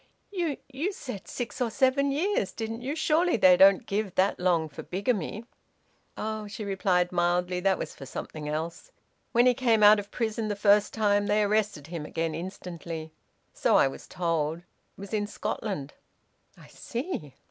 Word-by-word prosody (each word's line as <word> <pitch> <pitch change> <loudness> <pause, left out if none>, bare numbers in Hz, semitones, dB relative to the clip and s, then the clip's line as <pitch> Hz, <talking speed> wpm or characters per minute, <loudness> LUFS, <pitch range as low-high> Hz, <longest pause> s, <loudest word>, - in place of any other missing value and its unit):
"You 345 -7 -1
you 295 +9 -3
said 250 - -7
six 245 +1 -5
or 240 - +2
seven 270 +3 +2
years, 315 - 0
didn't 225 +1 -5
you? 275 +4 -3
Surely 325 0 +2
they 185 -3 +7
don't 195 +1 +6
give 200 -2 -2
that 190 +2 +2
long 175 -3 +2
for 145 - -9
bigamy?" 200 +2 -2 0.7
"Oh!" 215 -1 -3
she 210 +1 -6
replied 185 -3 +1
mildly. 180 +1 +1
"That 190 +1 +2
was - - -5
for 135 - -10
something 150 +3 -6
else. 160 +3 -4 0.4
When 240 +1 +4
he 250 - +6
came 230 -4 +2
out 210 0 +8
of 200 0 -7
prison 225 -2 -2
the 205 - -1
first 205 0 +4
time 205 -2 +2
they 210 +1 +3
arrested 210 -7 0
him 165 -1 -6
again 165 +1 -2
instantly 170 -2 -6 0.4
so - - +2
I - - +6
was 135 - -8
told. 165 -2 -1
It - - -32 0.3
was 200 +2 -9
in 205 -1 0
Scotland." 205 -8 -4 0.6
"I - - -15
see." 235 - -5
205 Hz, 170 wpm, -28 LUFS, 175-230 Hz, 0.7 s, out